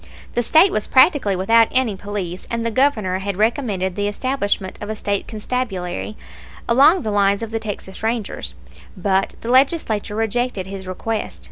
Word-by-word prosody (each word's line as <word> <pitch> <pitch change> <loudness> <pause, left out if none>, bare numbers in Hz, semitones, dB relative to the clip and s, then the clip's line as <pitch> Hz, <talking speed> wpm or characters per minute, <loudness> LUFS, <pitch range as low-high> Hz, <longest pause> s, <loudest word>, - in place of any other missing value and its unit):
The 240 - +1
State 320 - +5
was 215 - -1
practically 265 - +4
without 225 +5 +4
any 255 -5 +1
police, 190 -3 -5
and 230 0 -2
the 230 - 0
Governor 215 -8 +1
had 195 -1 -4
recommended 210 -5 0
the 205 0 -1
establishment 205 -4 -2
of 205 - -5
a 215 - -2
State 200 -2 -2
Constabulary, 215 -4 -4 0.5
along 285 +9 +5
the 215 - -2
lines 200 +1 +2
of 225 - -5
the 225 - -1
Texas 205 -3 -7
Rangers; 225 -2 -3 0.4
but 190 +1 0
the 235 - -3
Legislature 255 -6 +2
rejected 225 -2 -1
his 190 -1 -8
request. 215 +4 -4
215 Hz, 160 wpm, -20 LUFS, 195-240 Hz, 0.5 s, State